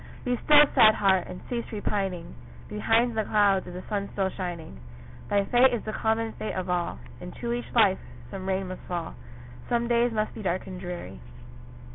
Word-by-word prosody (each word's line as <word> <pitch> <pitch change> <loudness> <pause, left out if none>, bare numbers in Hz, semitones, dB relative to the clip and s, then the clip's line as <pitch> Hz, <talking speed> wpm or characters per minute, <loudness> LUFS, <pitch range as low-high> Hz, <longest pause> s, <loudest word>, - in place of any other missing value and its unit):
Be 245 0 +1
still, 295 0 +8
sad 215 0 +7
heart! 190 -3 +2
and 180 - -8
cease 235 -1 -4
repining; 195 - -3 0.4
Behind 225 - +1
the 220 - +1
clouds 200 -3 +2
is 180 - -8
the 180 - -6
sun 200 -1 -2
still 195 -2 0
shining; 175 - -6 0.5
Thy 200 -1 +2
fate 245 +4 +5
is 230 - -5
the 215 - -5
common 225 0 0
fate 215 - -5
of 185 -1 -2
all, 175 -1 -1 0.2
Into 235 +7 -5
each 240 0 -5
life 205 -5 +5 0.3
some 190 -1 -6
rain 190 -1 -1
must 185 - -7
fall, 175 -2 -4 0.6
Some 235 -1 +1
days 240 0 +2
must 215 -1 -1
be - - -8
dark 185 -2 -1
and 185 -1 -7
dreary. 175 - -7
200 Hz, 185 wpm, -27 LUFS, 185-225 Hz, 0.6 s, still